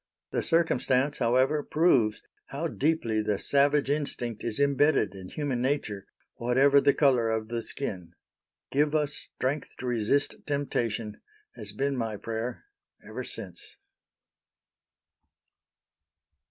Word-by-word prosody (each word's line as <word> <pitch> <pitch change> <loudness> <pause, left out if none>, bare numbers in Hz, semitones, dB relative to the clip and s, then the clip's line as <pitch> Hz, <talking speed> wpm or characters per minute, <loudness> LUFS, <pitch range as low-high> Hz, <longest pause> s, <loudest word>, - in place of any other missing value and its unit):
The - - 0
circumstance, 145 -4 +1
however, 130 +5 +3
proves 135 -10 +2 0.2
how 150 +5 -3
deeply 140 -9 0
the 105 -1 0
savage 145 +3 +3
instinct 135 -6 -2
is 115 -2 -3
imbedded 140 -6 +3
in 95 -1 -9
human 140 -5 -2
nature, 125 -7 -1 0.3
whatever 135 +4 +4
the 140 - +4
color 125 -6 +3
of 110 0 -2
the 120 0 -2
skin. 95 -9 -5 0.6
"Give 150 +2 +2
us 150 -1 +1
strength 140 +2 -4
to - - -7
resist 125 +3 +1
temptation," 115 -7 -2 0.3
has - - -6
been 140 0 -1
my 115 -4 -2
prayer 115 - -4 0.4
ever - - -5
since. - - -8
130 Hz, 115 wpm, -28 LUFS, 115-145 Hz, 0.6 s, whatever